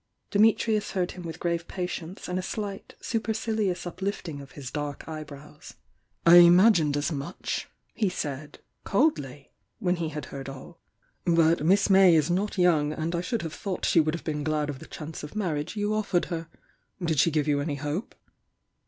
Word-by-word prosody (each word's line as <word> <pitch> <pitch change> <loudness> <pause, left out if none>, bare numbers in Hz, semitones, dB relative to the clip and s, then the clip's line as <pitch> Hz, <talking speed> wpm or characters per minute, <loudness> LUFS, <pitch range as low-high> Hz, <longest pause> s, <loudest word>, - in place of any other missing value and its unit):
Dimitrius 215 0 +3
heard 180 -2 0
him 180 -1 -9
witii 165 -1 -6
grave 170 -1 -2
patience 180 -1 -5
and 180 +1 -1
a - - -1
slight, 200 +1 -5
supercilious 220 -5 -1
uplift^ 190 +2 -4
ing 145 -3 -6
of 140 - -13
his 135 -4 -7
dark 145 -1 -5
eyebrows. 150 -1 -9 0.5
"I 170 +1 +9
imagined 175 -3 +6
as 145 +3 -1
much!" 145 +4 -4 0.2
he 210 -4 +1
said, 145 -4 -5 0.3
coldly, 145 - 0 0.3
when 180 -4 0
he 165 -2 -2
had 150 -3 -6
heard 135 -1 -6
all. 135 +5 -11 0.5
"But 165 -2 +3
Miss 195 +5 +4
May 190 -3 +7
is 155 +1 +2
not 200 +4 -1
young, 160 -5 +3
and 160 +2 -3
I 170 - 0
should 220 +4 -2
have 160 -1 -5
thought 195 -3 -3
she - - +4
would 155 0 +2
have 170 - -8
been 150 -2 -2
glad 150 -1 0
of 135 - -9
tiie - - -12
chance 155 +1 -7
of 150 +6 -9
marriage 170 -4 -2
you 205 0 0
offered 205 -4 +1
her. 165 -1 -4 0.5
Did 165 -5 0
she 165 - +5
give 155 -2 0
you 145 -1 +2
any 145 0 -2
hope?" 145 - -4
170 Hz, 185 wpm, -27 LUFS, 150-190 Hz, 0.5 s, I